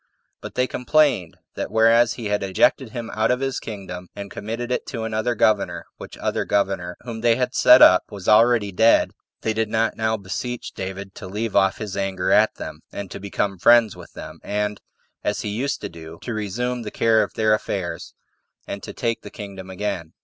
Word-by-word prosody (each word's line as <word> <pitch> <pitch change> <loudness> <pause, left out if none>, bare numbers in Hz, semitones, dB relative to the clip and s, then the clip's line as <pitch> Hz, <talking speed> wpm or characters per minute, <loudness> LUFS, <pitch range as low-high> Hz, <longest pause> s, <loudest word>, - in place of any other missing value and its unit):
But - - -8
they 125 - +2
complained, 130 - +1 0.2
that - - -4
whereas 115 +1 +4
they 120 - -8
had 105 -1 0
ejected 105 +6 +2
him 115 0 -6
out 110 - +1
of 125 - +2
his 135 -1 -2
kingdom, 95 -4 -7
and 100 -1 -7
committed 115 +3 -5
it - - -1
to 115 -5 -4
another 110 +2 -1
governor, 105 -2 +1
which - - -10
other - - -1
governor, 95 -3 -1
whom 115 -2 -7
they 115 -1 +4
had 125 +1 -1
set 125 0 +8
up, 90 - +7
was 100 -3 -9
already 110 -1 +5
dead, 110 +5 +4 0.3
they 110 - 0
did 110 0 -1
not 110 +1 +1
now 110 0 0
beseech 110 +5 -5
David 95 +1 -6
to 95 - -9
leave 105 +3 -3
off 95 -1 +3
his 105 -3 -5
anger 95 -2 -1
at - - +4
them, - - -7
and 100 -2 -7
to - - -6
become 100 -1 -2
friends 115 0 +5
with - - -13
them, - - -9
and, 105 0 -2 0.4
as 105 - -1
he 105 - -3
used 130 +7 -2
to 100 - -3
do, 80 -1 -11
to 120 - -4
resume 120 +4 -2
the 110 - -5
care 110 +1 +3
of - - -3
their 110 -1 +3
affairs, 95 -4 -3 0.5
and 100 - -6
take 115 -1 -3
the - - -9
kingdom 100 -3 -9
again. 95 -4 -4
110 Hz, 200 wpm, -23 LUFS, 100-115 Hz, 0.5 s, set